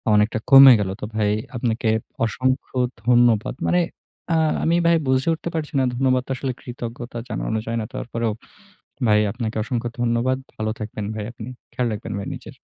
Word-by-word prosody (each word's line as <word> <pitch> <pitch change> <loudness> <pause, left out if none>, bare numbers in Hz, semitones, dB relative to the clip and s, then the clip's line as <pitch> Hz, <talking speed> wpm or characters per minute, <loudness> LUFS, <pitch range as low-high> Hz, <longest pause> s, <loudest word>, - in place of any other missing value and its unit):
অনেকটা 105 +2 +2
কমে 135 -1 +11
গেলো। 95 -2 -1
তো - - -2
ভাই 105 -1 +2 0.3
আপনাকে 115 -1 0 0.4
অসংখ্য 130 +4 -1 0.3
ধন্যবাদ। 120 -2 +3
মানে 180 - +3 0.5
আ - - +3 0.3
আমি 165 - +3
ভাই 170 0 +5
বুঝে 130 +4 +2
উঠতে 165 +1 -4
পারছি 155 -1 -3
না। - - +3
ধন্যবাদ 130 0 +2
তো - - -5
আসলে 135 0 -2
কৃতজ্ঞতা 120 -1 -7
জানানো 110 0 -2
যায় 115 +1 -2
না। - - -4
তারপরেও 115 -1 -2 0.8
ভাই 105 0 +5
আপনাকে 115 -2 -4
অসংখ্য 120 0 -2
ধন্যবাদ। 120 +2 +1 0.2
ভালো 110 0 -2
থাকবেন 105 -1 -5
ভাই 105 -1 -4
আপনি। 115 0 -8 0.2
খেয়াল 125 - -1
রাখবেন 105 - -5
ভাই 100 - -5
নিজের। - - -11
120 Hz, 170 wpm, -22 LUFS, 110-130 Hz, 0.8 s, কমে